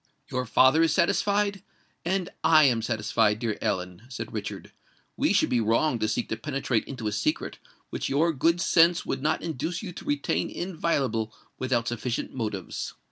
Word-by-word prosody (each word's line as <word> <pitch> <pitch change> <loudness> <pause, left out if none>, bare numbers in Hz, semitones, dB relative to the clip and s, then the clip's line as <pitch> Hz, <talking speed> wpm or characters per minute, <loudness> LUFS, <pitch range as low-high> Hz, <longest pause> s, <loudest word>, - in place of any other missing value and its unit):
"Your 125 -1 -2
father 130 +7 +5
is 165 -1 +4
satisfied—and 195 -1 -1
I 155 -1 +6
am 120 -5 +3
satisfied, 105 -2 +1
dear 110 -2 -2
Ellen," 90 0 -2
said 130 - -6
Richard: - - -5 0.4
"we - - +1
should - - +3
be 120 - +2
wrong 115 +4 +2
to 110 - +1
seek 110 - -1
to 110 - -2
penetrate 135 -6 -1
into 120 -5 -6
a - - 0
secret 105 0 -2 0.3
which - - -3
your 160 +5 +2
good 165 +5 +2
sense 170 0 +4
would - - -2
not 150 - 0
induce 170 +3 -3
you 190 - -5
to - - -10
retain 145 -1 0
inviolable 140 - -1 0.3
without 125 -3 0
sufficient 120 0 -3
motives. 105 -7 -4
130 Hz, 165 wpm, -27 LUFS, 115-165 Hz, 0.4 s, I